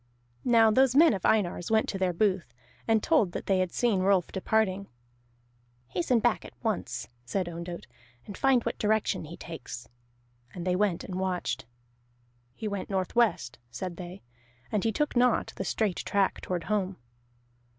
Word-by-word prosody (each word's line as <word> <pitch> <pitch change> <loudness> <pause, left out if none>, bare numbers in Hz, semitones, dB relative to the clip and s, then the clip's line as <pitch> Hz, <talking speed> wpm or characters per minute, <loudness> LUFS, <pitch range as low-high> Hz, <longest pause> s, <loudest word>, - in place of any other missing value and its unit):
Now 230 -2 +6
those 260 +2 +4
men 320 -2 +7
of 190 - 0
Einar's 180 -5 +1
went 220 0 +3
to 195 - -3
their 185 -1 +2
booth, 185 - 0 0.3
and 225 -2 +3
told 215 - +3
that - - -4
they 195 -1 +2
had 185 -2 0
seen 230 -6 +1
Rolf 190 -1 +2
departing. 200 0 0 1.0
"Hasten 185 - +1
back 230 0 +1
at - - -12
once," 220 -4 -2 0.2
said 180 +9 -2
Ondott, 170 +1 -6 0.4
"and 200 - -8
find 260 -1 +3
what - - -3
direction 215 -5 +1
he 170 +3 -9
takes." 140 -6 -8 0.7
And 175 -1 -5
they 180 -1 +2
went 195 -3 +1
and 185 -1 -5
watched. 185 -10 -2 0.9
"He 220 - -4
went 200 -2 -4
northwest," 190 - +1
said 170 +9 -5
they, 180 +2 -8 0.5
"and 210 - 0
he 225 - +2
took 295 +7 -1
not 245 -1 +3
the - - -3
straight 200 0 0
track 200 -1 0
toward 180 -2 -3
home." 200 -3 -1
195 Hz, 160 wpm, -28 LUFS, 180-220 Hz, 1.0 s, men